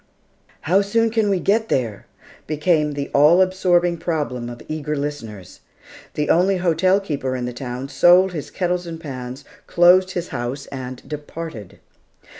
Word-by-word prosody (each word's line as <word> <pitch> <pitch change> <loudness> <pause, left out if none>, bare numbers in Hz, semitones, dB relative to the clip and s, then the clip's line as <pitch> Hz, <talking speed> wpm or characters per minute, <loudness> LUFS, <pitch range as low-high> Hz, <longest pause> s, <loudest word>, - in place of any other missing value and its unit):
"How 185 +6 +3
soon 225 +3 +1
can 220 -2 +1
we 195 -2 +1
get 220 +5 +1
there?" 115 -6 -2 0.4
became 150 0 +1
the 140 -1 -4
all 150 +5 +6
absorbing 180 -2 +2
problem 135 -8 -3
of 120 -1 -10
eager 150 -1 -3
listeners. 115 -10 -6 0.6
The 150 0 -1
only 185 +3 +3
hotel 185 +2 +2
keeper 140 -9 -3
in 125 -1 -3
the 125 - -4
town 125 +1 -6
sold 180 +5 +5
his 155 -4 -5
kettles 180 -1 -2
and 165 -1 -6
pans, 130 -3 -7 0.2
closed 185 +2 +4
his 175 - -4
house, 125 +2 -4
and 130 -2 -7
departed. 150 - -8
155 Hz, 150 wpm, -21 LUFS, 130-180 Hz, 0.6 s, all